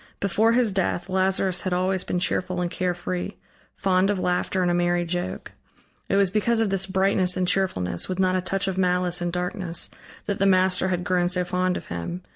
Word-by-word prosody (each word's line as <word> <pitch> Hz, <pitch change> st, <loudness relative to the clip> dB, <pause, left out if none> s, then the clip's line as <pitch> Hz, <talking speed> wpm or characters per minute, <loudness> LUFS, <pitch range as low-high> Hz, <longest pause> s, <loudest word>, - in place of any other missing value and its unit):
Before 215 Hz, +4 st, +2 dB
his 240 Hz, -3 st, +3 dB
death 190 Hz, -1 st, -1 dB
Lazarus 190 Hz, -1 st, +1 dB
had 185 Hz, -, -2 dB
always 185 Hz, +1 st, 0 dB
been -, -, -2 dB
cheerful 180 Hz, 0 st, 0 dB
and 175 Hz, -1 st, -1 dB
carefree, 180 Hz, +1 st, -3 dB, 0.4 s
fond 190 Hz, 0 st, +2 dB
of 205 Hz, -, +1 dB
laughter 185 Hz, +1 st, 0 dB
and 175 Hz, -, +2 dB
a -, -, +1 dB
merry 175 Hz, 0 st, +1 dB
joke. 175 Hz, +1 st, -4 dB, 0.6 s
It -, -, +2 dB
was 195 Hz, -2 st, +3 dB
because 225 Hz, +3 st, +1 dB
of 220 Hz, -3 st, +1 dB
this 190 Hz, -1 st, +1 dB
brightness 190 Hz, -1 st, +2 dB
and 180 Hz, -1 st, 0 dB
cheerfulness, 175 Hz, -, -1 dB
with 185 Hz, -, -2 dB
not 185 Hz, -1 st, +2 dB
a 185 Hz, -, +1 dB
touch 195 Hz, +1 st, -1 dB
of 190 Hz, -1 st, -2 dB
malice 180 Hz, -1 st, +1 dB
and 175 Hz, 0 st, -1 dB
darkness, 180 Hz, 0 st, -3 dB, 0.3 s
that 200 Hz, -, -2 dB
the 195 Hz, -, +3 dB
Master 185 Hz, 0 st, +3 dB
had 180 Hz, -1 st, -1 dB
grown 180 Hz, -1 st, +1 dB
so 180 Hz, 0 st, 0 dB
fond 180 Hz, 0 st, 0 dB
of -, -, -8 dB
him. 130 Hz, -, -5 dB
185 Hz, 205 wpm, -24 LUFS, 180-190 Hz, 0.6 s, his